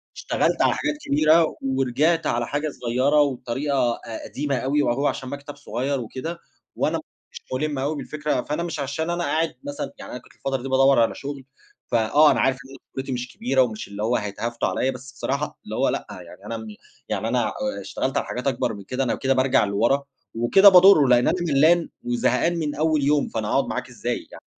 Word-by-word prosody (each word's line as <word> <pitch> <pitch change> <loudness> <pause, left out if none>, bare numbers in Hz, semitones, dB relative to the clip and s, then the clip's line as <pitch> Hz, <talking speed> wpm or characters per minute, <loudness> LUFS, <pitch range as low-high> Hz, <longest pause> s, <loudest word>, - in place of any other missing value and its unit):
اشتغلت - - 0
على - - +4
حاجات 300 0 -2
كبيرة 155 +3 +4
ورجعت 135 +5 +1
على 120 0 0
حاجة 145 +2 -2
صغيّرة 130 +3 +1
وبطريقة 130 -1 0
أ 115 - -7
قديمة 140 -1 -2
أوي 135 +4 +1
وهو 140 +2 +1
عشان 130 - -3
مكتب 145 +1 -7
صغيّر 140 -1 -3
وكده 145 +9 -6 0.4
وأنا - - 0
ما - - -8
كنتش - - -16
مُلم 145 +1 -1
أوي 145 +4 -1
بالفكرة، 150 -3 -2
فأنا 150 +4 -3
مش 170 -3 -4
عشان 145 +4 -2
أنا 175 0 -1
قاعد 160 +3 0
مثلًا 285 0 -5
يعني - - -9
أنا 125 - -6
كنت - - -21
الفترة 135 -2 -3
دي 135 - -5
بادوّر 135 -1 +4
على 115 - +1
شغل، 140 -1 -7 0.5
فآه، 120 +7 +5
أنا - - +1
عارف 130 0 +3
إن 135 +1 -13 0.2
قدرتي 135 0 -4
مش 125 0 -4
كبيرة 130 +1 +2
ومش 110 -4 -2
اللي 100 +1 -6
هو 120 +3 +1
هيتهافتوا 110 +3 -2
عليّا، 130 - 0
بس 130 +1 -10
بصراحة 140 +2 -3
اللي - - -6
هو - - +2
لأ، - - -2
يعني 90 +3 -11
أنا 115 +1 -4
م 110 - -8 0.4
يعني 110 +3 -1
أنا 120 -2 +1
آآ 265 - -4
اشتغلت 135 0 -3
على - - 0
حاجات 125 +2 -4
أكبر 125 -3 0
من 100 -1 -9
كده، 130 +6 -2
أنا 125 - 0
كده 135 0 +1
بارجع 130 -3 +3
لورا 115 +8 +1 0.3
وكده 195 - +7
باضرّه، 180 -5 +7
لإن 125 -1 +4
أنا - - +3
ملّان 165 +2 +3
وزهقان 125 +7 +1
من 150 -2 -2
أول 155 -1 +1
يوم، 145 +1 +2
فأنا 110 -2 -3
هاقعُد - - +2
معاك - - -4
إزاي؟ - - -4
يعني - - -12
135 Hz, 205 wpm, -23 LUFS, 120-150 Hz, 0.5 s, وكده